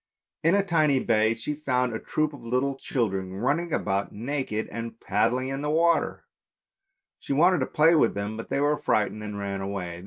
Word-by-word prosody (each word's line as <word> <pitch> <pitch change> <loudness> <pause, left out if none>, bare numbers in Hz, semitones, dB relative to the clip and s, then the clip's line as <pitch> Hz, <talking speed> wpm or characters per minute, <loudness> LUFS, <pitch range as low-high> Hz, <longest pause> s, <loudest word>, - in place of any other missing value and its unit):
In 165 +4 +4
a 200 - +3
tiny 155 -7 +3
bay 110 -2 +2
she 115 +6 -4
found 125 -5 0
a 110 - -3
troop 155 -1 -1
of 135 -4 -11
little 125 +4 0
children 95 -8 -2
running 150 - 0
about 100 -7 -1
naked 120 -1 -3
and 115 0 -6
paddling 120 +6 0
in 135 +1 -3
the 150 - -2
water; 165 +2 +1 0.9
she - - -3
wanted 175 +5 +4
to 130 - -1
play 160 +2 +4
with 160 - +3
them, 100 +2 -3
but 115 - -7
they - - 0
were 145 +1 +2
frightened 110 -3 0
and 105 -1 -5
ran 100 -1 -3
away. 95 -3 -4
125 Hz, 190 wpm, -26 LUFS, 105-150 Hz, 0.9 s, In